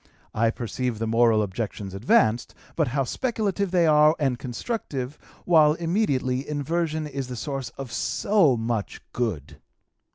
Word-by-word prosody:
I 115 +1 +2
perceive 120 0 -3
the 115 - -2
moral 115 -1 +3
objections 100 -1 -5
advanced, 110 +3 +2 0.2
but 160 -3 +1
how 135 +3 0
speculative 205 - -1
they 175 -1 +3
are, 150 0 +5
and 135 -5 0
constructive; 135 - -4 0.3
while, 155 -3 +5
immediately, 150 -7 -1
inversion 155 +2 -1
is 135 -3 -5
the 125 - -6
source 135 0 -4
of 135 -4 -7
so 175 - +2
much 115 -2 -3
good." 105 - -3
135 Hz, 135 wpm, -25 LUFS, 115-160 Hz, 0.3 s, are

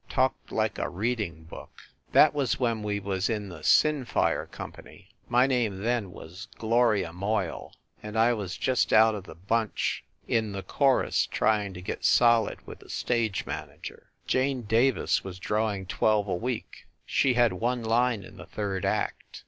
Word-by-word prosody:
Talked 130 0 0
like 110 -1 -1
a - - -1
reading 100 -4 -3
book. 80 - -11 0.4
That - - +6
was 140 -6 0
when 115 -3 0
we 105 -1 -2
was 95 0 -2
in 105 -3 -3
the 85 -3 -9
"Sinfire" 150 - +2
company 100 0 -11 0.2
my 120 +2 +4
name 115 -7 0
then 115 -4 0
was 90 +6 -10
Gloria 110 -6 +2
Moyle 95 0 -3 0.3
and 105 +1 -6
I 115 +2 +4
was 100 -5 -4
just 130 -2 +1
one 110 0 +6
of 100 -3 -6
the 80 - -11
bunch 105 +5 -1 0.2
in 110 -3 0
the 95 -1 -5
chorus 135 -2 +2
trying 105 -3 0
to 90 - -8
get - - -5
solid 115 -3 +3
with - - -10
the - - -17
stage 115 -5 -1
manager. - - -8 0.2
Jane 130 -1 0
Davis 115 +5 +2
was 95 -2 -7
drawing 105 0 -1
twelve 105 +2 +1
a 95 - -1
week. 120 +5 -5 0.2
She 130 -2 +2
had 120 -4 +4
one 120 +5 -1
line 115 -1 +1
in 95 +1 -13
the - - -11
third 100 -3 -3
act. - - -2
110 Hz, 165 wpm, -27 LUFS, 95-120 Hz, 0.4 s, That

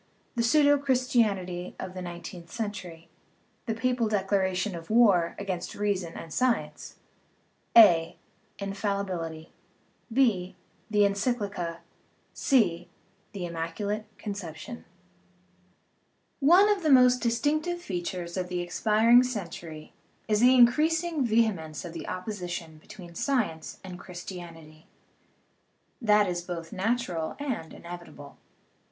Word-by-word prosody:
The 235 - +1
Pseudo 290 +4 +4
Christianity 220 -10 0
of 185 - -6
the 185 - -6
Nineteenth 175 -1 -8
Century 190 -7 -6 0.6
The 225 - -1
Papal 245 0 0
Declaration 195 -1 0
of 165 -1 -9
War 205 -7 +4
against 185 -3 -4
Reason 195 -5 -2
and 165 -1 -8
Science: 255 -2 -1 0.8
(a) 170 -7 +7 0.4
Infallibility, 195 -5 -3 0.6
(6) 220 -8 +2 0.3
The 210 -1 +1
Encyc 200 +4 +2
lica, 180 -5 -4 0.6
(c) 180 - +2 0.4
The 190 -3 -4
Immaculate 175 +6 -3
Conception 200 +2 -7 1.6
of 385 +7 +5
the 315 - +1
most 250 -2 +6
distinctive 300 +9 0
features 175 - -4
of 180 -1 -2
the 180 -1 -2
expiring 220 +6 +4
century 170 -10 -6 0.3
is 210 -1 +2
the 250 +3 +6
increasing 310 +5 +3
vehemence 210 - 0
of 170 - -7
the 165 - -7
oppo 185 +3 -5
sition 175 -5 -6
between 185 -4 -12
science 170 - -2
and 185 -2 -8
Christianity. 170 -4 -10 1.1
That 210 -2 +4
is 175 -1 -2
both 170 -2 -7
natural 190 -6 -1
and 260 - -4
inevitable. 170 -5 -10
195 Hz, 110 wpm, -28 LUFS, 175-235 Hz, 1.6 s, a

